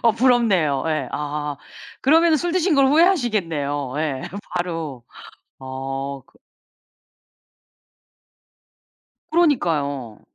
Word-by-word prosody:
어 230 -2 +5
부럽네요. 215 - +2
예. 155 -5 -1
아. 150 0 -3 0.4
그러면 320 +3 +4
술 345 +3 -2
드신 365 -1 +2
걸 275 -1 +5
후회하시겠네요. 200 - +1
예 145 -4 -2 0.3
바로. 165 -8 -4 0.5
어 135 +1 -5
그 - - -27 2.9
그러니까요. 150 - 0
160 Hz, 180 characters per minute, -22 LUFS, -, 2.9 s, 어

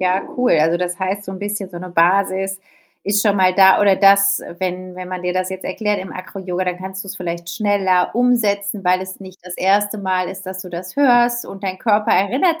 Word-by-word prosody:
ja, 185 +1 +1
cool. 250 0 +2
Also, 165 +2 +2
das 180 -1 -3
heißt, 195 +2 -2
so 190 - -7
’n 190 - -7
bisschen 205 -1 -4
so 175 - -8
’ne 180 +1 -8
Basis 190 +2 +1 0.4
ist 205 0 +1
schon 205 -2 +2
mal 185 -1 +3
da 190 0 +6
oder 200 -2 +5
das, 195 0 +4 0.2
wenn 185 0 -4
wenn 185 0 -7
man 185 -1 -5
dir 180 0 -1
das 185 0 -1
jetzt 190 0 -7
erklärt 210 +2 -2
im 190 - -8
AcroYoga, 185 -1 -5
dann 180 -1 -2
kannst 190 +1 -7
du’s 195 0 -7
vielleicht 170 -1 -5
schneller 200 -5 +1
umsetzen, 210 -5 +1
weil 180 +1 +3
es 185 +1 -8
nicht 190 -1 -12
das 180 -1 -7
1. 205 +3 +1
Mal 185 -2 -1
ist, 190 +1 -8
dass 185 0 -6
du 185 - -10
das 180 +4 -8
hörst 240 -3 +3
und 195 - -10
dein 185 -1 -4
Körper 210 -1 +1
erinnert 265 - +2
190 Hz, 225 wpm, -19 LUFS, 185-205 Hz, 0.4 s, da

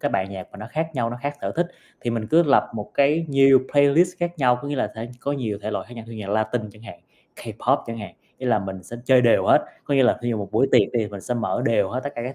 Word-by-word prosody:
cái - - -1
bài 95 - 0
nhạc 95 -2 -8
mà - - -11
nó 105 - -7
khác 160 +1 -2
nhau, 115 -2 -1
nó 120 - -5
khác 145 +1 -2
sở - - -3
thích, 175 - +1 0.3
thì 120 - -2
mình 115 -2 -2
cứ 160 +8 +5
lập 140 -5 +3
một 105 -2 -6
cái 150 +4 +2
nhiều 135 -1 +6
playlist 150 +6 +4
khác 175 -1 -3
nhau, 125 -2 +3
có 145 - -5
nghĩa 145 - -2
là 105 -5 -1
thể 110 +1 -6
có 140 - -2
nhiều 115 -7 -3
thể 110 - -3
loại - - -4
khác 125 - -11
nhau 115 - -8
như - - -9
nhạc 100 -2 -6
Latinh 110 0 -1
chẳng 110 - -17
hạn, 105 -6 -11 0.4
K-pop - - 0
chẳng 115 0 -6
hạn, 105 - -8 0.2
nghĩa 130 - -5
là 120 -3 +3
mình 95 -2 -6
sẽ 115 +7 -9
chơi 130 -1 +5
đều 120 -2 +4
hết, - - +5 0.2
có 145 - 0
nghĩa 135 - +5
là 125 - +4
thí 120 - -1
dụ 115 - -1
một 100 - -5
buổi 135 - +3
tiệc - - +5
thì 115 -3 +1
mình 100 -1 -8
sẽ 125 - -3
mở 120 +1 -1
đều 105 -4 +2
hết 130 +4 -2
tất 140 - -3
cả 120 - -4
các 135 - -6
120 Hz, 305 wpm, -23 LUFS, 110-140 Hz, 0.4 s, nhiều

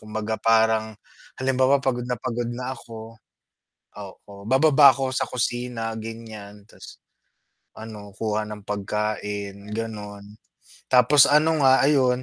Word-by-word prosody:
kumbaga 110 0 -4
parang 110 -1 +1 0.4
halimbawa, 130 +1 +2
pagod 130 -2 -2
na 125 -2 -2
pagod 120 -1 -4
na 125 +2 -5
ako 115 -2 -11 0.9
oo, 100 +1 -12 0.2
bababa 140 +1 +6
ako 135 0 -2
sa 130 - -1
kusina 120 -2 -3
ganyan. 110 -2 -10
Tas - - -14 0.8
ano 105 -2 -10
kuha 110 -1 -1
ng 105 -1 -8
pagkain 105 0 -4
ganon, 105 -2 -7 0.5
tapos 130 +3 +6
ano 155 +2 +3
nga 130 0 +5
ayun, 130 -3 +2
115 Hz, 120 wpm, -23 LUFS, 105-130 Hz, 0.9 s, bababa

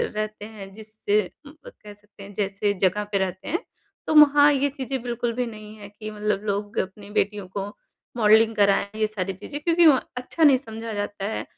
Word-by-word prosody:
रहते 215 -1 -4
हैं 205 -3 -10
जिससे 215 0 -1 0.3
उम, 285 - -11
अ, - - -8
कह 210 -1 -10
सकते 205 0 -17
हैं 200 +1 -11
जैसे 200 +1 -1
जगह 195 +2 +2
पे 200 - +2
रहते 190 -1 -3
हैं, 345 - 0 0.5
तो - - +1
वहाँ 295 -1 +7
ये 280 +1 +1
चीज़ें 265 -1 -3
बिल्कुल 240 -1 -2
भी 250 +1 -1
नहीं 215 -1 -10
हैं 205 -1 -11
कि 215 -1 -6
मतलब 210 -1 -1
लोग 205 0 -3
अपनी 200 +2 -5
बेटियों 205 -1 -2
को 195 0 -2 0.5
मॉडलिंग 220 0 +5
कराएँ 200 +1 +2
ये 215 - +2
सारी 195 -3 -4
चीज़ें 285 +10 -8
क्योंकि 335 +1 +4
वहाँ 275 -4 +4
अच्छा 255 +6 -2
नहीं 280 -4 +7
समझा 225 -3 -7
जाता 205 -1 -4
है, 220 - -3
215 Hz, 200 wpm, -24 LUFS, 205-240 Hz, 0.5 s, वहाँ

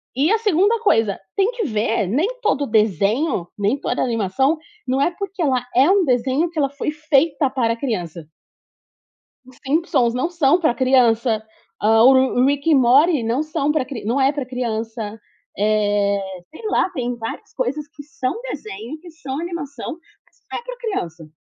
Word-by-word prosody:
E 290 - +2
a 445 - +4
2ª 420 +2 +2
coisa, 225 - +2 0.2
tem 395 +4 +2
que 475 -4 -3
ver, 215 - 0
nem 285 - +1
todo 355 - +1
o - - -8
desenho, 210 - 0
nem 205 +7 +1
toda - - -2
animação, 240 - +1 0.3
não 265 +2 +1
é 345 - +2
porque 390 -2 -5
ela 270 -5 +2 0.2
uma 365 +10 +5
é - - -1
desenho 260 +6 +1
que 340 - -13
ela 275 -2 +2
foi 285 +2 -4 0.2
feita 285 0 +3
para 235 -4 0
criança. 180 - -4 1.2
Os 255 -1 -17
Simpsons 265 -5 +1
não 255 +7 -1
são 335 -1 +3
pra 310 -8 +2
criança, 235 -4 +3 0.4
hã, 220 +1 +5
o 260 +2 +8
Ru 260 -1 +3
Rick 285 +3 +1
e 310 - +6
Morty 270 +3 +4
não 235 +5 0
são 300 -1 -1
pra 300 -4 0
cri 260 -6 -7
não 245 +5 0
é 270 +2 +4
pra 285 -3 -4
criança. 225 -3 -4 0.4
Eh, 205 -1 +1 0.3
sei 320 - -13
lá, - - +2
tem 245 -7 -3
várias 225 -1 -7
coisas 275 +4 -3
que 300 -2 -12
são 270 - -4
desenho, 240 - -7
que 350 - -12
são 280 -3 -6
animação, 335 -1 -5 0.3
mas - - -33 0.2
não - - -3
é - - -14
pra - - -7
criança. 175 - -5
265 Hz, 180 wpm, -20 LUFS, 225-315 Hz, 1.2 s, o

